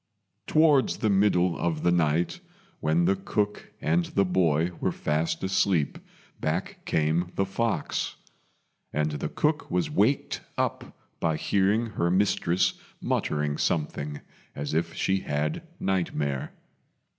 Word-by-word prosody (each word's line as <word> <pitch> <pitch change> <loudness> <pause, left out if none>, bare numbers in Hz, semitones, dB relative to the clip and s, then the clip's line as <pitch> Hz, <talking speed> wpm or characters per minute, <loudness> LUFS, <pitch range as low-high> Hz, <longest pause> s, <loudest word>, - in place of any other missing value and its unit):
Towards 155 -4 +4
the 110 -4 +1
middle 95 -3 +3
of 80 -3 -1
the 85 - +4
night, 85 - +1 0.4
when 80 +3 +2
the 95 +2 +3
cook 105 +2 -2
and 85 +2 +1
the 100 +3 +1
boy 85 -2 +2
were - - +1
fast 80 +2 -1
asleep, 95 -4 +1 0.4
back - - -2
came 80 +3 +1
the 95 - +1
fox; 110 +3 -1 0.8
and 75 0 0
the 75 0 -3
cook 150 +1 0
was 165 -4 0
waked 135 +1 +1 0.2
up - - -2 0.2
by 80 -2 +1
hearing 100 +6 +2
her 85 -4 0
mistress 90 -1 +2 0.3
muttering 75 -1 -1
something 75 -2 -1 0.3
as 70 +1 -4
if 85 +1 0
she 95 0 +1
had 75 -2 -2
nightmare. 75 -7 -1
85 Hz, 125 wpm, -27 LUFS, 75-100 Hz, 0.8 s, Towards